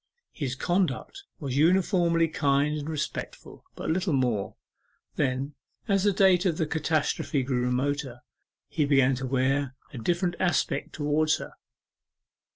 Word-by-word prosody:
His 135 -5 -3
conduct 180 - -1
was 135 -5 -4
uniformly 170 0 +3
kind 145 -1 +1
and 150 0 -5
respectful, 155 -3 -5
but - - -3
little 180 0 0
more. 120 -7 0 0.6
Then, 135 0 -1 0.3
as 195 -2 +2
the 205 - +5
date 190 -2 +4
of 175 -5 +1
the 160 - +1
catastrophe 155 -2 0
grew 125 -1 0
remoter, 130 0 -1 0.5
he 155 - 0
began 135 -2 +4
to 130 0 -4
wear 135 +1 0 0.2
a 125 - -6
different 175 +8 0
aspect 180 -2 0
towards 150 +1 +1
her. - - -8
150 Hz, 135 wpm, -27 LUFS, 135-170 Hz, 0.6 s, the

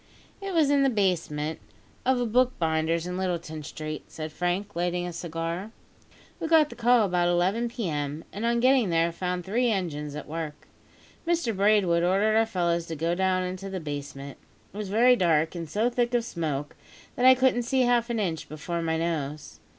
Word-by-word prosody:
"It 390 -2 -4
was 305 -4 +4
in 285 -1 +4
the 275 - +4
basement 165 - -1 0.5
of 260 -1 +3
a 245 - 0
bookbinder's 170 -9 +1
in 180 +1 -4
Littleton 170 -4 -3
Street," 155 +1 -6
said 155 -1 -7
Frank, 180 +5 -2
lighting 175 +1 -1
a 175 - -5
cigar. 170 +3 -4 0.7
"We - - -2
got 315 -2 +4
the - - -8
call 240 -1 +4
about 175 -2 +1
11 185 +7 +1
p.m., 155 -9 -3
and 205 - -5
on 235 0 +2
getting 255 -4 +4
there 165 0 +2
found 180 0 -3
three 240 +5 +1
engines 150 -8 -2
at 150 - -7
work. 155 -1 -6 0.6
Mr 335 -10 +1
Braidwood 195 -4 +3
ordered 195 +5 +2
our 225 0 +3
fellows 170 -4 0
to 165 - -4
go 165 +3 0
down 185 0 +1
into 185 +2 -5
the 190 -1 -4
basement. 145 -2 -7 0.3
It - - -10
was 210 -2 -4
very 240 +5 +5
dark, 165 -6 +2
and 165 -3 -6
so 215 +8 +1
thick 245 0 0
of 235 -1 +1
smoke 150 -7 -3 0.4
that 250 - +3
I 260 - +9
couldn't 255 -1 +2
see 260 +2 +1
half 240 -1 +2
an 235 -1 -1
inch 170 -6 -2
before 170 +3 -4
my 160 -1 0
nose. 155 -3 -3
180 Hz, 190 wpm, -27 LUFS, 165-230 Hz, 0.7 s, I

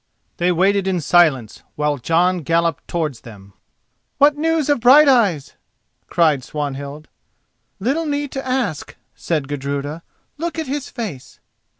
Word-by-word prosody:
They 175 0 +1
waited 190 +2 +2
in 185 -2 0
silence 150 -8 +2
while 150 -1 -1
Jon 175 +7 +1
galloped 165 0 -1
towards 155 -8 -3
them. 100 -4 -14 0.6
"What 290 +1 +5
news 320 0 0
of 290 -3 +2
Brighteyes?" 245 - +4 0.5
cried 155 -6 +2
Swanhild. 145 +1 -6 0.7
"Little 280 +10 -1
need 290 -1 -2
to 270 - -5
ask," 255 - -3 0.2
said 155 -5 -3
Gudruda, 145 +2 -4 0.4
"look 335 +1 -3
at 320 - -2
his 275 0 -4
face." 205 - -7
175 Hz, 125 wpm, -19 LUFS, -, 0.7 s, What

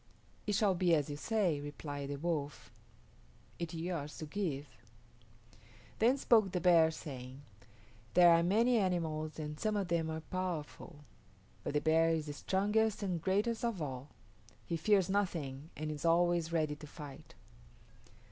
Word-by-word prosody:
"It 205 - +1
shall 200 -1 +3
be 175 -2 +3
as 150 -1 -1
you - - -4
say," 175 -3 0
replied 145 -1 -6
the 145 - -2
Wolf. 150 -2 -3 0.9
"It 170 -2 -3
is - - -4
yours 165 -4 -4
to 155 - -5
give." 150 -4 -3 1.3
Then 245 +5 +4
spoke 220 -7 +4
the 180 - -1
Bear, 170 -3 +5
saying, 135 -4 -8 0.7
"There 175 -1 +8
are 165 0 +5
many 225 +7 +3
animals 160 -5 -1
and 150 -1 -5
some 215 -1 0
of 195 -3 -2
them 165 -2 0
are 160 0 -4
powerful; 165 -3 -5 0.6
but - - -3
the 150 - +2
bear 165 +1 +4
is 160 -2 0
the 145 - -5
strongest 210 +7 +1
and 180 -4 -2
greatest 205 +6 0
of 230 -5 -1
all. 135 -2 -5 0.6
He 170 - -2
fears 190 +2 +3
nothing 165 -8 -2
and 155 0 -3
is 150 0 -6
always 170 0 +3
ready 155 -3 0
to 150 - -10
fight." 145 -3 -11
165 Hz, 155 wpm, -34 LUFS, 150-190 Hz, 1.3 s, There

